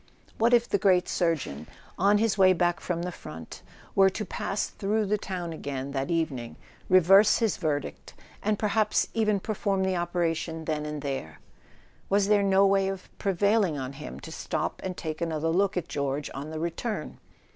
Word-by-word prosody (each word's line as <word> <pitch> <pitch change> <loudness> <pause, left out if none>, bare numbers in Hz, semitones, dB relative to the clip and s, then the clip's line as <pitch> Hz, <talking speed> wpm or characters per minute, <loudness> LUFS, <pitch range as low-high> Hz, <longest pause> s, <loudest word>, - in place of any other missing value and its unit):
What 230 +2 +4
if 240 -1 +4
the 200 - +1
great 185 -2 +3
surgeon, 150 - -1 0.3
on 200 +3 +4
his 220 -1 +2
way 190 -2 +6
back 175 -1 +1
from 170 -1 -3
the 180 - -3
front, 80 - -10 0.3
were 195 0 +6
to 215 +3 -4
pass 195 +1 -2
through 210 +2 -1
the 210 +1 0
town 180 -4 -4
again 140 -3 -5
that 135 +2 -2
evening, 145 -9 -2 0.3
reverse 195 +3 +6
his 225 -4 +1
verdict, 150 -5 -3 0.3
and 210 0 0
perhaps 215 0 +1
even 215 -3 +2
perform 195 -1 -1
the 190 -1 +1
operation 165 -2 -2
then 150 -1 -2
and 150 -1 -5
there? 135 - -4 0.7
Was 200 0 +2
there 210 -1 +5
no 195 0 +4
way 195 0 +3
of 195 -1 -6
prevailing 200 -3 +2
on 130 0 -4
him 150 +2 -8
to 160 - -9
stop - - -3
and 185 -1 -4
take 155 -1 -5
another 165 -1 -1
look 195 +3 +1
at 180 - -2
George 140 0 -2
on 140 +3 -6
the 160 - -5
return 170 +7 -4
180 Hz, 180 wpm, -27 LUFS, 155-200 Hz, 0.7 s, way